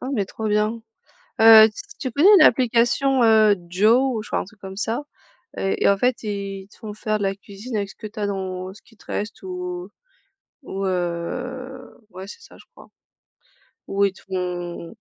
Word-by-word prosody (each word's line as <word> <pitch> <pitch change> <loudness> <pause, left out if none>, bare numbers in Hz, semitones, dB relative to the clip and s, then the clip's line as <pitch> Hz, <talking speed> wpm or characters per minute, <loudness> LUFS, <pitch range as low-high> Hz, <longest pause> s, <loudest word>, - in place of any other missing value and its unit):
Ah 255 - -5
mais 210 -6 0
trop 220 - -6
bien, 210 +2 0 0.6
heu, 220 -1 +9
ts - - -14 0.3
tu 260 - -4
connais 295 - +4
l'application, 250 +1 +3
heu, 215 -2 +5
Jow, 225 +7 +3
enfin, 215 - -3
un - - -4
truc 205 +2 -19
comme 190 -1 -9
ça, 225 +6 -2 0.5
et 195 - -2
et - - +6
en 200 - +4
fait, 250 +1 0
ils 200 -2 -5
te - - -21
font 210 -2 -8
faire 215 0 -2
de - - -5
la 195 0 0
cuisine 205 +4 -8
avec 200 -1 -2
ce - - -15
que 215 - -8
tu 215 +2 -11
as 205 - 0
dans 185 -2 -4
ce 210 - -18
qui 225 - -23
te - - -22
reste 210 0 -5
ou 180 0 -6 0.7
ou, 195 -5 -4
heu, 190 +9 -4
ouais, 190 0 -10
c'est 340 - -11
ça - - -16
je - - -18
crois - - -15 1.0
ou 200 +1 0
ils 195 - -1
te - - -18
font 180 -1 -5
205 Hz, 195 wpm, -22 LUFS, 190-225 Hz, 1.0 s, heu